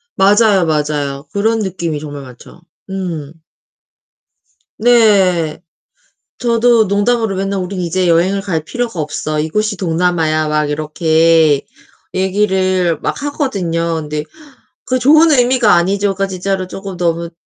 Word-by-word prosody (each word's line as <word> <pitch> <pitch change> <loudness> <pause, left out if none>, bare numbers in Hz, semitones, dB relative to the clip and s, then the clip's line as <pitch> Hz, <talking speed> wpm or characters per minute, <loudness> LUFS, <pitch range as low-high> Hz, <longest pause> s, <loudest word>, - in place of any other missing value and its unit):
맞아요, 200 -1 +4
맞아요. 150 -2 -2
그런 220 +3 +1
느낌이 170 -6 -3
정말 145 -2 -8
많죠. 125 +7 -15 0.3
음. 170 -6 -5 1.5
네. 195 -10 +3 0.8
저도 235 -1 +3
농담으로 205 +1 0
맨날 195 0 -2
우리는 185 0 -4
이제 180 +2 0
여행을 180 +4 +2
갈 165 -6 -3
필요가 235 -2 -4
없어. 155 0 -3
이곳이 210 +8 -1
동남아야. 165 -3 0
막 150 -1 0
이렇게 160 0 +2 0.5
얘기를 185 -3 0
막 285 - -3
하거든요. 180 - -2
근데 150 0 -4 0.6
그 255 0 0
좋은 310 +5 +5
의미가 245 -4 +3
아니죠. 195 +3 +1
그러니까 195 +1 -2
진짜로 190 0 -3
조금 195 0 -8
너무 170 0 -1
185 Hz, 275 characters per minute, -15 LUFS, 160-205 Hz, 1.5 s, 좋은